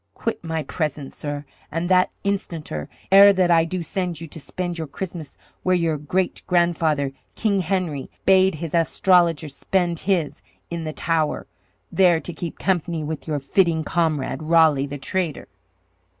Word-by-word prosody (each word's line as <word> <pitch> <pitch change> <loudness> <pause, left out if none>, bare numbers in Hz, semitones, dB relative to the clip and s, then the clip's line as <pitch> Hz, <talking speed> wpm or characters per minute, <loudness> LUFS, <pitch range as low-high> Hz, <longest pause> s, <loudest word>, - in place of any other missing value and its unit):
Quit 230 - -3
my 160 -1 -2
presence, 150 -2 -3
sirrah, 145 0 -5 0.3
and 165 +3 -2
that 185 0 +4
instanter, 170 - -3 0.2
ere 200 +1 +9
that 185 -2 +2
I 165 -1 +5
do 175 +1 -3
send 180 -1 -3
you 165 - -6
to 160 - -8
spend 175 +3 -4
your 160 - -3
Christmas 170 -1 -7 0.2
where 185 0 +2
your 165 -4 0
great 175 +5 -1
grandfather, 165 -5 +2 0.2
King 205 -3 +1
Henry, 180 -6 -2 0.2
bade 190 -2 +5
his 160 0 -6
astrologer 170 -1 +3
spend 175 +3 -1
his 180 -6 -1 0.3
in 170 -1 -3
the 155 - -4
Tower, 160 -2 0 0.5
there 180 -4 +4
to 175 - -6
keep 165 +1 -6
company 170 -4 -1
with 155 +1 -5
your 150 -2 0
fitting 160 +3 +1
comrade, 155 -4 -1
Raleigh, 155 -3 +4
the 145 +1 -6
traitor!" 165 +3 -2
165 Hz, 155 wpm, -23 LUFS, 155-180 Hz, 0.5 s, ere